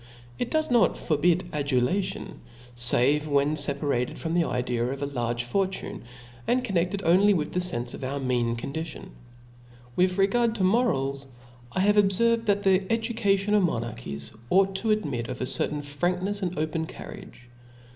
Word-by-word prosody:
It 245 Hz, -, -1 dB
docs 315 Hz, -3 st, 0 dB
not 240 Hz, -2 st, +4 dB
forbid 170 Hz, +3 st, +1 dB
adulation, 145 Hz, +7 st, -1 dB, 0.5 s
but 150 Hz, +5 st, +2 dB
when 145 Hz, 0 st, +2 dB
feparate 140 Hz, -3 st, 0 dB
from 165 Hz, 0 st, -3 dB
the 170 Hz, -1 st, +2 dB
idea 125 Hz, -1 st, -1 dB
of 135 Hz, +3 st, -3 dB
a -, -, +1 dB
large 120 Hz, -3 st, -2 dB
fortune, 190 Hz, +3 st, -3 dB, 0.4 s
and 250 Hz, +1 st, +2 dB
conneftcd 190 Hz, -1 st, 0 dB
only 195 Hz, +4 st, +5 dB
with 150 Hz, -3 st, -2 dB
the 180 Hz, -, -1 dB
fenfe 125 Hz, -10 st, -3 dB
of -, -, -8 dB
our 135 Hz, +2 st, -3 dB
mean 120 Hz, -3 st, 0 dB
condition; 155 Hz, +7 st, -5 dB
^ -, -, -11 dB, 0.9 s
With 185 Hz, +1 st, +2 dB
regard 225 Hz, +4 st, +2 dB
to 200 Hz, -, -1 dB
morals, 140 Hz, -, +1 dB, 0.4 s
I 185 Hz, -, -1 dB
have 205 Hz, +2 st, +3 dB
obfcrved, 225 Hz, +3 st, +3 dB
that 205 Hz, 0 st, +2 dB
the 190 Hz, 0 st, +2 dB
education 220 Hz, -3 st, +1 dB
of 210 Hz, -, +5 dB
nK)narchies 115 Hz, -, -3 dB
ought 195 Hz, +1 st, +3 dB
to 220 Hz, -, -2 dB
admit 145 Hz, -, 0 dB
of 130 Hz, -, -5 dB
a -, -, -1 dB
certain 150 Hz, +3 st, -1 dB
franknefs 180 Hz, +8 st, -2 dB
and 180 Hz, -2 st, -3 dB
open 160 Hz, +1 st, -2 dB
carriage. 125 Hz, -, -11 dB
170 Hz, 160 wpm, -26 LUFS, 135-195 Hz, 0.9 s, only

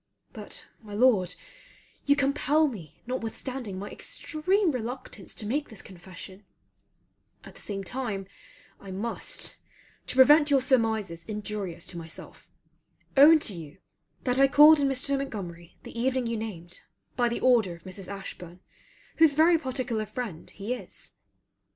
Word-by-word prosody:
But, -, -, -8 dB, 0.2 s
my 210 Hz, -2 st, -9 dB
Lord, 205 Hz, -7 st, +3 dB, 0.7 s
you 285 Hz, -, +6 dB
compel 290 Hz, +2 st, +2 dB
me 190 Hz, -, -9 dB
notwithstanding 245 Hz, -2 st, -4 dB
my 200 Hz, +2 st, -5 dB
extreme 365 Hz, +4 st, 0 dB
reluctance 245 Hz, -5 st, -6 dB
to 215 Hz, -, -4 dB
make 290 Hz, +7 st, -1 dB
this 215 Hz, -3 st, -10 dB
confession; 185 Hz, +1 st, -11 dB, 1.0 s
at -, -, -12 dB
the -, -, -9 dB
same 195 Hz, -1 st, -3 dB
time 210 Hz, -2 st, -3 dB, 0.5 s
I 195 Hz, -, -11 dB
must, 230 Hz, -, -2 dB, 0.5 s
to -, -, -3 dB
prevent 295 Hz, +3 st, +7 dB
your 280 Hz, -1 st, +5 dB
surmises 220 Hz, -9 st, +1 dB
injurious 210 Hz, -4 st, -5 dB
to 175 Hz, -, -6 dB
myself, 165 Hz, 0 st, -10 dB, 0.7 s
own 295 Hz, +4 st, +9 dB
to 210 Hz, -, +1 dB
you 160 Hz, -5 st, -9 dB, 0.5 s
that 250 Hz, 0 st, +1 dB
I 275 Hz, -, +7 dB
called 300 Hz, +3 st, +8 dB
on 280 Hz, -, +3 dB
Mr. 270 Hz, +1 st, 0 dB
Montgomery 180 Hz, -10 st, -6 dB
the -, -, -10 dB
evening 255 Hz, +1 st, 0 dB
you 230 Hz, 0 st, -1 dB
named 190 Hz, -6 st, -6 dB, 0.3 s
by 240 Hz, -1 st, +2 dB
the 235 Hz, -, -2 dB
order 230 Hz, -9 st, +4 dB
of 170 Hz, -, -18 dB
Mrs. 190 Hz, 0 st, -8 dB
Ashburn 185 Hz, -3 st, -8 dB, 0.6 s
whose 320 Hz, -3 st, +6 dB
very 325 Hz, +2 st, +5 dB
particular 255 Hz, -6 st, -2 dB
friend 215 Hz, -7 st, -6 dB
he 205 Hz, +5 st, -4 dB
is. 250 Hz, -, -8 dB
230 Hz, 145 wpm, -28 LUFS, 195-270 Hz, 1.0 s, own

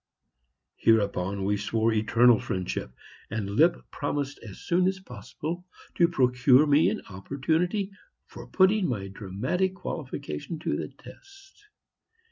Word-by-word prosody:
Hereupon 100 Hz, -3 st, +1 dB
we 105 Hz, +1 st, +1 dB
swore 110 Hz, +2 st, 0 dB
eternal 115 Hz, +1 st, +4 dB
friendship, 90 Hz, -8 st, -3 dB, 0.4 s
and 105 Hz, -3 st, -3 dB
Lipp 165 Hz, +11 st, +4 dB, 0.2 s
promised 145 Hz, -1 st, -3 dB
as 105 Hz, -4 st, -11 dB
soon 180 Hz, +1 st, +1 dB
as 190 Hz, 0 st, -1 dB
possible 155 Hz, -, -7 dB, 0.3 s
to 170 Hz, -, +4 dB
procure 125 Hz, -2 st, +4 dB
me 145 Hz, +1 st, +4 dB
an -, -, -4 dB
opportunity 160 Hz, -, -1 dB, 0.3 s
for -, -, -11 dB
putting 190 Hz, 0 st, +3 dB
my 100 Hz, -6 st, -3 dB
dramatic 105 Hz, -, -2 dB
qualifications 150 Hz, -, -6 dB
to -, -, 0 dB
the -, -, -3 dB
test. 395 Hz, +1 st, -17 dB
135 Hz, 120 wpm, -27 LUFS, -, 0.4 s, eternal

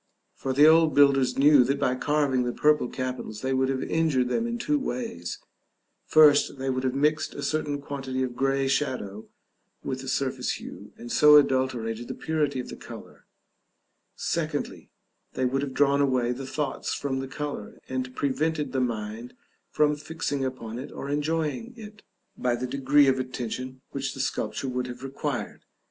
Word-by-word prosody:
For 135 Hz, -, -4 dB
the 145 Hz, +3 st, +6 dB
old 160 Hz, -2 st, +5 dB
builders 140 Hz, -2 st, +4 dB
knew 145 Hz, -1 st, +7 dB
that 135 Hz, +3 st, 0 dB
by 125 Hz, -, +2 dB
carving 140 Hz, -1 st, +1 dB
the 120 Hz, 0 st, -1 dB
purple 150 Hz, -2 st, +2 dB
capitals 125 Hz, -4 st, -5 dB
they 130 Hz, 0 st, -1 dB
would 130 Hz, 0 st, +1 dB
have 135 Hz, -1 st, -1 dB
injured 150 Hz, -6 st, +1 dB
them 230 Hz, -, 0 dB
in 235 Hz, 0 st, -2 dB
two 290 Hz, +5 st, 0 dB
ways: 105 Hz, -, -4 dB, 0.7 s
first, 150 Hz, -2 st, +5 dB
they 135 Hz, 0 st, -1 dB
would 130 Hz, 0 st, -2 dB
have 130 Hz, 0 st, 0 dB
mixed 150 Hz, +2 st, +1 dB
a 145 Hz, -, -5 dB
certain 145 Hz, 0 st, -1 dB
quantity 135 Hz, -2 st, -4 dB
of 125 Hz, -2 st, -4 dB
grey 135 Hz, +1 st, +1 dB
shadow 125 Hz, -7 st, -2 dB, 0.6 s
with 130 Hz, 0 st, -3 dB
the 135 Hz, -, -9 dB
surface 135 Hz, 0 st, -1 dB
hue, -, -, -9 dB
and 120 Hz, 0 st, -8 dB
so 150 Hz, 0 st, +7 dB
adulterated 130 Hz, -5 st, +2 dB
the -, -, -5 dB
purity 150 Hz, -4 st, -1 dB
of 125 Hz, -, -5 dB
the -, -, -7 dB
color; -, -, -12 dB, 0.9 s
secondly, -, -, -3 dB, 0.4 s
they 130 Hz, -, 0 dB
would 135 Hz, +2 st, 0 dB
have 140 Hz, -2 st, -4 dB
drawn 140 Hz, 0 st, +3 dB
away 130 Hz, -3 st, +2 dB
the 130 Hz, +2 st, -5 dB
thoughts 140 Hz, 0 st, -2 dB
from 135 Hz, -2 st, -2 dB
the 135 Hz, -, -4 dB
color, 145 Hz, +1 st, -6 dB
and 130 Hz, -1 st, -4 dB
prevented 145 Hz, +1 st, -1 dB
the 130 Hz, 0 st, 0 dB
mind 115 Hz, 0 st, -4 dB, 0.3 s
from 150 Hz, 0 st, +2 dB
fixing 150 Hz, -2 st, -3 dB
upon 120 Hz, -3 st, -5 dB
it 130 Hz, -, -7 dB
or 140 Hz, -, -6 dB
enjoying 155 Hz, -, -2 dB
it, 210 Hz, -2 st, -11 dB, 0.3 s
by 125 Hz, -1 st, 0 dB
the 125 Hz, +1 st, -3 dB
degree 140 Hz, +2 st, +3 dB
of 130 Hz, 0 st, +3 dB
attention 130 Hz, 0 st, -5 dB
which 135 Hz, -1 st, -3 dB
the -, -, -9 dB
sculpture 135 Hz, 0 st, -2 dB
would 125 Hz, 0 st, -2 dB
have 125 Hz, +1 st, -8 dB
required. 135 Hz, -1 st, -4 dB
135 Hz, 175 wpm, -26 LUFS, 130-145 Hz, 0.9 s, knew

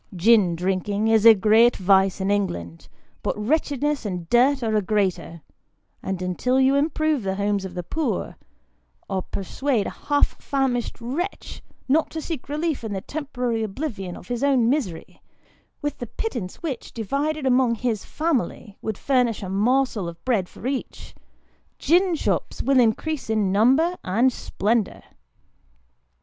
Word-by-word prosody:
Gin 190 Hz, -2 st, +4 dB
drinking 195 Hz, +4 st, -1 dB
is 225 Hz, 0 st, +5 dB
a 225 Hz, -, +10 dB
great 220 Hz, +4 st, +4 dB
vice 190 Hz, 0 st, +3 dB
in 190 Hz, +1 st, 0 dB
England, 85 Hz, -, -2 dB, 0.3 s
but -, -, -2 dB
wretchedness 290 Hz, +4 st, 0 dB
and 180 Hz, -5 st, -4 dB
dirt 260 Hz, +2 st, +4 dB
are 220 Hz, -1 st, 0 dB
a 210 Hz, -, +3 dB
greater; 190 Hz, -5 st, -1 dB, 0.6 s
and 190 Hz, -1 st, -3 dB
until 250 Hz, +9 st, 0 dB
you 265 Hz, +1 st, +4 dB
improve 305 Hz, 0 st, +1 dB
the 190 Hz, -1 st, -2 dB
homes 200 Hz, 0 st, -1 dB
of 185 Hz, -1 st, -8 dB
the 180 Hz, -, -4 dB
poor, 315 Hz, -, -2 dB, 0.7 s
or 190 Hz, -1 st, -1 dB
persuade 220 Hz, +5 st, -2 dB
a -, -, -3 dB
half 290 Hz, -1 st, 0 dB
famished 265 Hz, -5 st, -1 dB
wretch 290 Hz, +12 st, -4 dB, 0.3 s
not 305 Hz, +4 st, +2 dB
to 320 Hz, -, -5 dB
seek 315 Hz, -4 st, -6 dB
relief 305 Hz, -2 st, -2 dB
in 220 Hz, -2 st, -4 dB
the 190 Hz, -, -3 dB
temporary 250 Hz, -6 st, -3 dB
oblivion 210 Hz, -, -4 dB
of -, -, -13 dB
his 245 Hz, +1 st, -3 dB
own 265 Hz, -5 st, +3 dB
misery, 225 Hz, -, -3 dB, 0.6 s
with 290 Hz, -, -3 dB
the 240 Hz, -, -5 dB
pittance 235 Hz, -, -5 dB
which, 275 Hz, -8 st, -5 dB
divided 280 Hz, +7 st, -2 dB
among 250 Hz, -2 st, +3 dB
his 225 Hz, -3 st, -2 dB
family, 270 Hz, -9 st, -2 dB
would 220 Hz, -2 st, -3 dB
furnish 250 Hz, -6 st, +1 dB
a 190 Hz, -, -5 dB
morsel 220 Hz, 0 st, +1 dB
of 170 Hz, 0 st, -13 dB
bread 215 Hz, -8 st, +1 dB
for -, -, -12 dB
each, 265 Hz, 0 st, -4 dB, 0.6 s
gin 350 Hz, +3 st, +3 dB
shops -, -, -2 dB
will 270 Hz, -1 st, +3 dB
increase 250 Hz, +4 st, 0 dB
in 215 Hz, -4 st, +1 dB
number 265 Hz, -, +3 dB
and 235 Hz, +7 st, +2 dB
splendour. 220 Hz, 0 st, -1 dB
230 Hz, 150 wpm, -23 LUFS, 195-275 Hz, 0.7 s, a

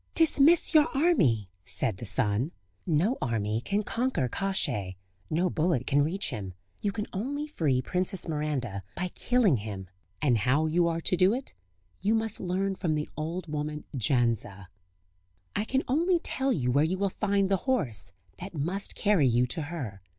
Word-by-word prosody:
"Dismiss 325 Hz, +1 st, +5 dB
your 310 Hz, -1 st, +6 dB
army," 160 Hz, -, +3 dB, 0.2 s
said 95 Hz, +1 st, -1 dB
the 120 Hz, -, -7 dB
sun. 115 Hz, +5 st, 0 dB, 0.4 s
"No 175 Hz, -, +2 dB
army 110 Hz, -3 st, -1 dB
can 205 Hz, +7 st, 0 dB
conquer 235 Hz, -, 0 dB
Kosciey, 110 Hz, -, -1 dB, 0.3 s
no 170 Hz, +4 st, +1 dB
bullet 160 Hz, -7 st, 0 dB
can 145 Hz, 0 st, +3 dB
reach 165 Hz, +4 st, -1 dB
him; 95 Hz, -7 st, -6 dB, 0.3 s
you 205 Hz, -, 0 dB
can 210 Hz, +1 st, -3 dB
only 280 Hz, +9 st, -2 dB
free 145 Hz, -, 0 dB
Princess 185 Hz, -, -2 dB
Miranda 145 Hz, -10 st, -2 dB
by 180 Hz, 0 st, -2 dB
killing 225 Hz, -, +2 dB
him, 100 Hz, -3 st, -6 dB, 0.3 s
and 125 Hz, -6 st, +2 dB
how 130 Hz, +8 st, +2 dB
you 170 Hz, +2 st, +2 dB
are 165 Hz, 0 st, -1 dB
to 180 Hz, -, +2 dB
do 185 Hz, +5 st, +4 dB
it, 265 Hz, +1 st, -6 dB, 0.5 s
you 210 Hz, +3 st, +2 dB
must 225 Hz, -1 st, -1 dB
learn 190 Hz, +2 st, -1 dB
from 170 Hz, -5 st, -1 dB
the 150 Hz, 0 st, -3 dB
old 165 Hz, +3 st, -4 dB
woman 150 Hz, -1 st, -4 dB
Jandza; 115 Hz, -6 st, 0 dB, 0.9 s
I 210 Hz, -, 0 dB
can 265 Hz, +4 st, 0 dB
only 340 Hz, +7 st, +3 dB
tell 270 Hz, -5 st, 0 dB
you 125 Hz, -, +1 dB
where 140 Hz, +4 st, +4 dB
you 175 Hz, +4 st, 0 dB
will 200 Hz, 0 st, 0 dB
find 200 Hz, -1 st, +1 dB
the 195 Hz, 0 st, +2 dB
horse, 110 Hz, -, +2 dB, 0.3 s
that 185 Hz, 0 st, -8 dB
must 175 Hz, +7 st, -3 dB
carry 200 Hz, -10 st, +3 dB
you 120 Hz, +1 st, +3 dB
to 125 Hz, +6 st, -2 dB
her. 140 Hz, -, -6 dB
165 Hz, 170 wpm, -28 LUFS, 125-200 Hz, 0.9 s, your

